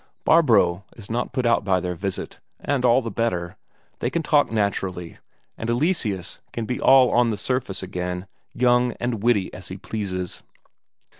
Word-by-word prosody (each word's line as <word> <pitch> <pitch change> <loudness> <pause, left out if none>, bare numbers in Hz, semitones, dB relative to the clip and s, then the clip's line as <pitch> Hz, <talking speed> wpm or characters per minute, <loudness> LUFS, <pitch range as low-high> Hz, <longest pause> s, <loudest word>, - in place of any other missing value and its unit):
Barbro 100 - +4
is 110 -1 -10
not 120 +2 -2
put 130 -2 -1
out 120 - +3
by 95 -2 +2
their 90 0 -3
visit, 95 +2 -5 0.2
and 140 -3 -1
all 125 +1 +4
the 115 - -4
better; 90 -7 -2 0.4
they 120 - 0
can 165 +4 -2
talk 145 -4 +3
naturally, 95 -5 -2 0.4
and 115 - -3
Eleseus 120 - -1
can 115 - -4
be 125 +2 -3
all 130 -2 +6
on 120 -1 +3
the 110 - -2
surface 125 -8 -2
again, 90 0 -4 0.3
young 125 0 +2
and 120 -4 -3
witty 110 -5 +1
as 90 - -8
he 95 - -7
pleases. 95 -3 -4
110 Hz, 165 wpm, -23 LUFS, 95-125 Hz, 0.4 s, all